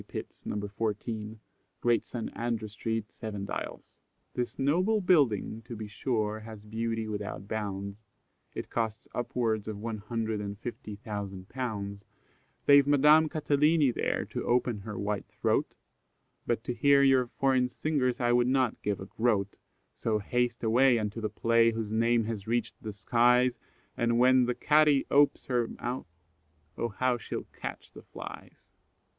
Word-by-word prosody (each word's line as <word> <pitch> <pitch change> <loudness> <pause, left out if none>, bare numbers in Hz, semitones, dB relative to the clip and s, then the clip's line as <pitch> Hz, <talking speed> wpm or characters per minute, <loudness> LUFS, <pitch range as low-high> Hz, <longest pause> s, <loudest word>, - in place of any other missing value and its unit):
Pitts, - - -8
No. 105 - -2
14, 110 +1 -4 0.4
Great 120 -1 +2
St. 120 -3 -5
Andrew 115 -2 -2
street, 110 +1 -3
Seven 105 -3 -5
Dials. - - -6 0.4
"This 125 -1 -3
noble 180 +11 +2
building, 135 - +2
to 120 - -7
be 110 -1 -6
sure, 110 0 -1
has 110 -1 -10
beauty 115 +1 -2
without 105 -2 -5
bounds, 100 -1 -4 0.6
It - - -6
cost 115 0 -2
upwards 115 -3 -1
of 110 -2 -4
one 110 0 -4
hundred 110 0 -2
and 100 0 -5
fifty 110 -2 -7
thousand 100 -3 -6
pounds; 100 -6 -4 0.6
They've 140 -1 +7
Madame 150 +2 +6
Catalini 150 -2 +3
there - - -1
to - - -3
open 120 -2 +1
her 105 +1 -7
white 100 0 -2
throat, - - 0 0.7
But 115 -1 0
to 125 - -2
hear 140 +3 +5
your 130 -2 +4
foreign 130 0 +1
singers 130 -3 0
I 120 -1 +2
would 120 0 +4
not 130 -2 +1
give 100 -1 -1
a 95 - -6
groat; 105 -3 0 0.4
So 110 -2 0
haste 120 +4 -1
away 120 +3 +5
unto 110 +1 -3
the 110 - -1
play, 115 +2 +3
whose 110 -2 -3
name 115 +1 +3
has 110 -2 -5
reached 120 +1 -1
the 110 - -5
skies, 120 +5 +3 0.4
And 115 0 +1
when 130 +1 +5
the 125 0 -1
Cati 150 -2 +4
ope's 145 +1 +4
her 120 -3 +1
mouth, 125 -1 -5 0.7
oh 120 - -2
how 125 +3 0
she'll - - -5
catch - - -7
the - - -12
flies!" - - -11
115 Hz, 155 wpm, -29 LUFS, 105-125 Hz, 0.7 s, They've